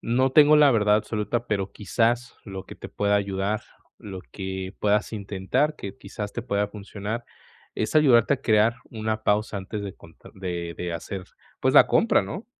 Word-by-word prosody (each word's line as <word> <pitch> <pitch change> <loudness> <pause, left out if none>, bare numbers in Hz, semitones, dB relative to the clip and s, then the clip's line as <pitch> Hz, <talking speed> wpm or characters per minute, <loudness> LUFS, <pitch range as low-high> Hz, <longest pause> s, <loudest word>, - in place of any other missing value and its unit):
No 130 +3 +1
tengo 150 +1 +7
la 150 -2 +7
verdad 105 -4 +3
absoluta, 110 +2 -2
pero 100 -3 -1
quizás 115 +4 0
lo 95 -2 -7
que - - -10
te - - -9
pueda 100 0 0
ayudar, 100 +1 -1 0.4
lo 95 -3 -8
que 95 0 -5
puedas 105 +2 +1
intentar 100 - -1
que 100 - -7
quizás 100 +1 -6
te - - -4
pueda 105 -4 -1
funcionar, 105 +2 -6 0.5
es 110 - -2
ayudarte 135 -4 +5
a 135 - -9
crear 110 +1 +3
una 110 -1 -3
pausa 105 0 +1
antes 100 +2 -5
de 100 -1 -5
conta 80 - -16
de 90 -3 -4
de 90 -1 -4
hacer, 90 +3 -6 0.4
pues - - +2
la - - +8
compra, - - +3
¿no?, 145 - -7
105 Hz, 175 wpm, -25 LUFS, 95-115 Hz, 0.5 s, la